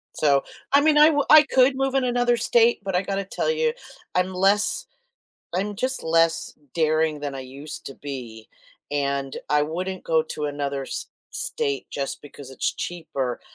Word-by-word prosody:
So, 140 Hz, -2 st, +3 dB, 0.3 s
I 280 Hz, -, +7 dB
mean, 300 Hz, 0 st, +4 dB
I 300 Hz, +1 st, +8 dB
wou 290 Hz, -2 st, +2 dB, 0.3 s
could 260 Hz, +1 st, +5 dB
move 270 Hz, 0 st, 0 dB
in 270 Hz, -, +3 dB
another 245 Hz, -1 st, +2 dB
state, 235 Hz, 0 st, +3 dB
but 195 Hz, -2 st, -2 dB
I 180 Hz, -, +3 dB
got 195 Hz, 0 st, -3 dB
to 195 Hz, 0 st, -2 dB
tell 195 Hz, -, -2 dB
you, 470 Hz, 0 st, +1 dB, 0.4 s
I'm 180 Hz, +1 st, +1 dB
less, 195 Hz, +3 st, +2 dB, 0.7 s
I'm 200 Hz, +3 st, -1 dB
just 255 Hz, +4 st, -1 dB
less 165 Hz, 0 st, +2 dB, 0.2 s
daring 155 Hz, -1 st, +1 dB
than 145 Hz, -1 st, -4 dB
I 135 Hz, -, -5 dB
used 135 Hz, +4 st, -6 dB
to 135 Hz, -, -6 dB
be. 120 Hz, -6 st, -8 dB, 0.4 s
And 140 Hz, -1 st, -1 dB
I 150 Hz, 0 st, +4 dB
wouldn't 180 Hz, +5 st, -4 dB
go 160 Hz, -1 st, +2 dB
to 155 Hz, -1 st, -5 dB
another 140 Hz, -1 st, -2 dB
s -, -, -3 dB, 0.2 s
state 140 Hz, -1 st, -2 dB
just 140 Hz, -1 st, -4 dB
because 140 Hz, -2 st, -11 dB
it's 130 Hz, -, -1 dB
cheaper. 140 Hz, -8 st, -4 dB
165 Hz, 175 wpm, -24 LUFS, 140-230 Hz, 0.7 s, I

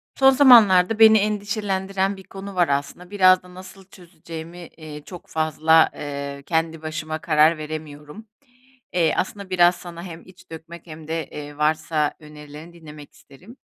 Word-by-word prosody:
Son 270 Hz, 0 st, +5 dB
zamanlarda 225 Hz, -7 st, +5 dB
beni 220 Hz, 0 st, +7 dB
endişelendiren 200 Hz, -2 st, -2 dB
bir 190 Hz, -, -13 dB
konu 195 Hz, +1 st, -10 dB
var 175 Hz, -2 st, +2 dB
aslında 145 Hz, +6 st, -4 dB
biraz 185 Hz, -2 st, +4 dB
da 180 Hz, 0 st, -16 dB
nasıl 190 Hz, +1 st, -13 dB
çözeceğimi, 170 Hz, -2 st, -11 dB, 0.2 s
eee, 155 Hz, -2 st, -10 dB
çok 180 Hz, +1 st, -12 dB
fazla, 160 Hz, +1 st, +2 dB
eee, 140 Hz, -1 st, -7 dB
kendi 160 Hz, -1 st, -2 dB
başıma 155 Hz, 0 st, -5 dB
karar 155 Hz, +1 st, +3 dB
veremiyorum. 155 Hz, +5 st, -9 dB, 0.7 s
Eee, 170 Hz, -3 st, +1 dB
aslında 200 Hz, 0 st, -4 dB
biraz 175 Hz, -1 st, +3 dB
sana 170 Hz, -1 st, -10 dB
hem 170 Hz, -3 st, -10 dB
iç 185 Hz, 0 st, -19 dB
dökmek 165 Hz, +1 st, -11 dB
hem 155 Hz, -1 st, -11 dB
de, 165 Hz, 0 st, -4 dB
eee, 145 Hz, -1 st, -9 dB
varsa 155 Hz, 0 st, 0 dB
önerilerini 150 Hz, +1 st, -13 dB
dinlemek 150 Hz, -3 st, -14 dB
isterim. 185 Hz, -, -18 dB
165 Hz, 150 wpm, -22 LUFS, 155-190 Hz, 0.7 s, beni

